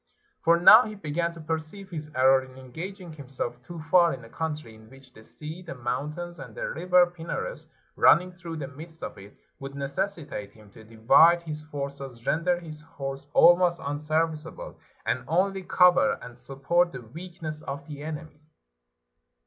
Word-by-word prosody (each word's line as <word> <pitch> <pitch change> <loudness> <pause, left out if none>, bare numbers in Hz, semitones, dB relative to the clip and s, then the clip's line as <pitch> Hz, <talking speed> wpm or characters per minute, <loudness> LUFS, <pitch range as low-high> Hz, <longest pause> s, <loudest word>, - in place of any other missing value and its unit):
For 170 +1 +5
now 215 +7 +9
he 215 0 -6
began 170 -2 -2
to - - -10
perceive 160 +5 -5
his 155 -3 -6
error 130 +1 +5
in 130 0 -14
engaging 170 +7 -8
himself 125 -4 -5
too 170 +6 -9
far 175 -2 +5
in 120 - -13
a - - -14
country 155 -5 -4
in 110 0 -17
which 135 0 -17
the 110 - -15
sea, 155 +9 -9
the 170 -5 -8
mountains, 150 +8 -4
and - - -10
the - - -3
river 180 - +4
Pinarus 175 - -6 0.3
nmning 180 +1 +5
through 170 -2 -7
the 145 -3 -5
midst 160 +4 -11
of - - -5
it, 100 +1 -14 0.2
would 135 0 -7
necessi 155 +5 -3
tate 105 -8 -7
him 105 -2 -18
to 110 - -14
divide 135 +10 +5
his 155 -2 -5
forces, 140 -5 -7
render 175 +2 +1
his 155 -3 -9
horse 140 -3 -7
almost 175 0 +6
unserviceable, 155 +2 -3 0.3
and 125 - -1
only 190 +5 +1
cover 180 +7 +4
and 125 - -10
support 140 +8 0
the 125 - -8
weakness 155 +3 -8
of 140 0 -6
the 145 -1 -8
enemy. 155 0 -7
155 Hz, 170 wpm, -27 LUFS, 135-175 Hz, 0.3 s, now